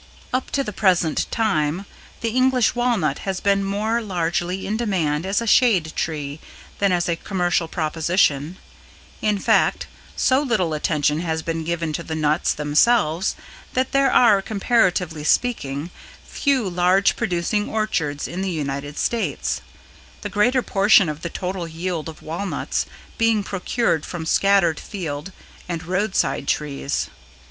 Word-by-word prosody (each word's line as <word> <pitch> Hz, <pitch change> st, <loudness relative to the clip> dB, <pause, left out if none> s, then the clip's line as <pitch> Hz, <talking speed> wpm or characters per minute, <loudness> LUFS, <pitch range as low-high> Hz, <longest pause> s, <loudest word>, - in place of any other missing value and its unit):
Up 255 Hz, 0 st, -1 dB
to 275 Hz, -, 0 dB
the 210 Hz, -, -5 dB
present 180 Hz, -6 st, +2 dB
time, 190 Hz, -5 st, 0 dB, 0.4 s
the 230 Hz, -, -1 dB
English 255 Hz, 0 st, +3 dB
Walnut 235 Hz, -, 0 dB
has 190 Hz, -1 st, -3 dB
been 200 Hz, 0 st, +2 dB
more 215 Hz, +4 st, 0 dB
largely 175 Hz, -2 st, -2 dB
in 210 Hz, -, -1 dB
demand 185 Hz, -8 st, 0 dB
as 200 Hz, +3 st, +1 dB
a -, -, -3 dB
shade 210 Hz, -9 st, +3 dB
tree 150 Hz, -2 st, -3 dB, 0.4 s
than 200 Hz, -1 st, +3 dB
as 175 Hz, -1 st, +1 dB
a 170 Hz, -, +1 dB
commercial 175 Hz, -1 st, -1 dB
proposition; 160 Hz, -1 st, 0 dB, 0.6 s
in 210 Hz, -1 st, +1 dB
fact, -, -, +2 dB, 0.3 s
so 260 Hz, +2 st, +3 dB
little 215 Hz, -, 0 dB
attention 150 Hz, 0 st, +1 dB
has 160 Hz, -2 st, -2 dB
been 165 Hz, -1 st, -2 dB
given 165 Hz, -1 st, -2 dB
to 170 Hz, -, -2 dB
the 160 Hz, -1 st, -5 dB
nuts 155 Hz, +1 st, +1 dB
themselves 155 Hz, +4 st, +2 dB, 0.4 s
that 255 Hz, +1 st, 0 dB
there 275 Hz, -1 st, +3 dB
are, 210 Hz, -5 st, +5 dB
comparatively 190 Hz, -7 st, +1 dB
speaking, 150 Hz, -, 0 dB, 0.3 s
few 270 Hz, -7 st, 0 dB
large 180 Hz, +2 st, +3 dB
producing 180 Hz, +4 st, -1 dB
orchards 165 Hz, -10 st, -1 dB
in 180 Hz, +3 st, -5 dB
the 195 Hz, -, -1 dB
United 145 Hz, -3 st, -4 dB
States, 235 Hz, -2 st, -1 dB, 0.6 s
the 205 Hz, -, -4 dB
greater 240 Hz, +5 st, +2 dB
portion 195 Hz, -3 st, +4 dB
of 150 Hz, +1 st, -5 dB
the 170 Hz, -, -4 dB
total 180 Hz, 0 st, -4 dB
yield 165 Hz, 0 st, -4 dB
of 160 Hz, -, -12 dB
walnuts 170 Hz, +5 st, -3 dB, 0.3 s
being 225 Hz, -2 st, +3 dB
procured 195 Hz, -3 st, -1 dB
from 170 Hz, -3 st, -6 dB
scattered 195 Hz, -2 st, +3 dB
field 165 Hz, -3 st, -5 dB, 0.4 s
and 170 Hz, -1 st, -3 dB
roadside 185 Hz, -5 st, 0 dB
trees. 145 Hz, -1 st, -1 dB
180 Hz, 140 wpm, -22 LUFS, 160-210 Hz, 0.6 s, are